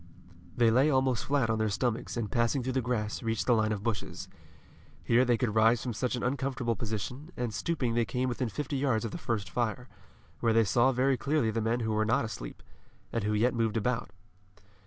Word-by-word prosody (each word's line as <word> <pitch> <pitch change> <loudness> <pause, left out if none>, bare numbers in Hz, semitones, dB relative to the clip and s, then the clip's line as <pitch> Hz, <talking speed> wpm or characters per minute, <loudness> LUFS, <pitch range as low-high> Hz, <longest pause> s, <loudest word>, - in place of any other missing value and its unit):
They 115 -2 +5
lay 130 +6 +4
almost 130 -3 +1
flat 135 -5 +1
on 110 - 0
their 110 0 +1
stomachs, 120 +4 -2
and 110 -3 -3
passing 120 +2 +1
through 130 +1 -2
the 130 - +1
grass, 115 -3 -2
reached 115 -2 -1
the 125 - +4
line 110 -1 +2
of 105 -1 -3
bushes. 110 -4 -3 0.7
Here 120 +2 +4
they 120 -2 +2
could 120 -4 -1
rise 115 +2 +4
from 125 - -3
such 125 +3 -1
an 120 - -4
uncomfortable 130 -2 -1
position, 110 - -5
and 120 -3 -2
stooping 135 -7 -1
they 120 0 +2
came 125 +3 -1
within 125 -1 -2
fifty 145 +4 -3
yards 130 -5 +1
of 110 - -4
the - - -6
first 105 -4 -2
fire, 120 +6 -2 0.5
where 115 -1 +2
they 115 0 +5
saw 120 +5 +3
very 130 +1 +2
clearly 140 -4 +1
the 115 +1 -1
men 115 +2 0
who 110 -1 -1
were 110 0 +2
not 115 +4 +1
asleep, - - -7 0.5
and 115 -3 -1
who 105 - +1
yet 115 +4 +2
moved 115 -2 0
about. 125 -1 -1
120 Hz, 215 wpm, -30 LUFS, 110-130 Hz, 0.7 s, They